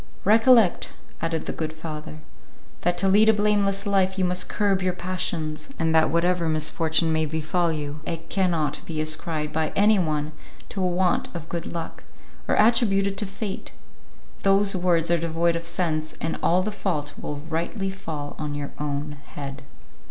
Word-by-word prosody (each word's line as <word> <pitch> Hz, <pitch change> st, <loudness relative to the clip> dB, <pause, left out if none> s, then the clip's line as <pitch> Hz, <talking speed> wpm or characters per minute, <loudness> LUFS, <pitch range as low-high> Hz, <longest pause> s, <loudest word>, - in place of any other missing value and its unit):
"Recollect," 225 Hz, -1 st, +5 dB, 0.3 s
added 165 Hz, -1 st, -2 dB
the -, -, -2 dB
good 155 Hz, -1 st, -3 dB
father, 155 Hz, -1 st, -7 dB, 0.6 s
"that 175 Hz, 0 st, +1 dB
to 195 Hz, -, +2 dB
lead 210 Hz, +3 st, +5 dB
a -, -, +7 dB
blameless 205 Hz, -1 st, +1 dB
life 190 Hz, -1 st, +2 dB
you 185 Hz, -, +2 dB
must 180 Hz, 0 st, 0 dB
curb 200 Hz, -2 st, +1 dB
your 185 Hz, -1 st, +1 dB
passions, 175 Hz, -, -3 dB
and 160 Hz, -1 st, +1 dB
that 160 Hz, -1 st, +5 dB
whatever 170 Hz, 0 st, +1 dB
misfortune 160 Hz, +1 st, +2 dB
may 155 Hz, 0 st, +1 dB
befall 160 Hz, +3 st, 0 dB
you 150 Hz, -1 st, -4 dB
it 165 Hz, 0 st, -5 dB
cannot 165 Hz, -7 st, 0 dB
be 160 Hz, -2 st, -3 dB
ascribed 155 Hz, 0 st, -1 dB
by 160 Hz, -1 st, 0 dB
any 210 Hz, +1 st, +5 dB
one 155 Hz, -3 st, -1 dB, 0.4 s
to 195 Hz, -, -4 dB
a 185 Hz, -, +2 dB
want 180 Hz, 0 st, +1 dB
of 165 Hz, -1 st, -6 dB
good 170 Hz, -1 st, -4 dB
luck, 165 Hz, -1 st, -6 dB, 0.4 s
or -, -, +2 dB
attributed 205 Hz, -3 st, +3 dB
to 210 Hz, -, -1 dB
fate; 195 Hz, 0 st, -5 dB, 0.7 s
those 195 Hz, 0 st, +4 dB
words 175 Hz, -2 st, +2 dB
are 170 Hz, -, +3 dB
devoid 165 Hz, +1 st, +1 dB
of 170 Hz, 0 st, -4 dB
sense, 155 Hz, -3 st, -1 dB
and 165 Hz, -, -2 dB
all 180 Hz, +2 st, +3 dB
the 215 Hz, -, -2 dB
fault 155 Hz, -8 st, -2 dB
will 145 Hz, -, -4 dB
rightly 170 Hz, +5 st, -2 dB
fall 155 Hz, -6 st, -6 dB
on 150 Hz, -1 st, -3 dB
your 145 Hz, -1 st, -4 dB
own 145 Hz, 0 st, -3 dB, 0.2 s
head." 140 Hz, -1 st, -6 dB
170 Hz, 170 wpm, -25 LUFS, 155-195 Hz, 0.7 s, a